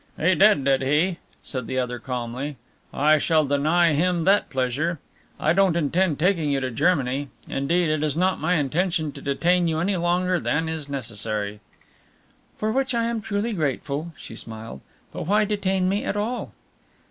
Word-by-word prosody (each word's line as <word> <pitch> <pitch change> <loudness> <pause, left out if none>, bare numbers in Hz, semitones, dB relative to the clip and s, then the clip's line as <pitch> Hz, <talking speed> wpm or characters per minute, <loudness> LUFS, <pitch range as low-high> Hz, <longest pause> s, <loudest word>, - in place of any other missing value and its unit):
"He 185 +4 +4
did, 195 -4 +5
did 135 -1 +3
he?" 155 +7 +1 0.2
said 130 -4 -5
the 130 - -3
other 125 -1 -2
calmly. 125 +3 -4 0.3
"I 155 +2 +3
shall 155 0 +2
deny 155 +4 +3
him 170 +3 +1
that 195 +4 +3
pleasure. 135 +6 -1 0.4
I 155 - +2
don't 190 -2 +3
intend 170 0 +1
taking 170 -2 +1
you 140 -1 +1
to 130 -1 -3
Germany. 140 -1 +1 0.2
Indeed, 165 +6 +1
it 155 -1 0
is 150 0 -1
not 185 +2 +1
my 170 +4 +1
intention 160 +1 0
to - - -11
detain 175 +5 +2
you 160 -1 0
any 185 +3 0
longer 175 +1 +1
than 160 +1 0
is 160 -3 -5
necessary." 110 -5 -4 1.0
"For 215 +1 -1
which 265 0 0
I 230 - +1
am 230 -1 -1
truly 205 +3 -2
grateful," 150 -1 -2
she - - -10
smiled, 110 - -8 0.3
"but - - -5
why 210 +2 +3
detain 195 -3 0
me 200 +2 0
at 205 - -2
all?" 225 +4 -3
160 Hz, 170 wpm, -24 LUFS, 140-185 Hz, 1.0 s, did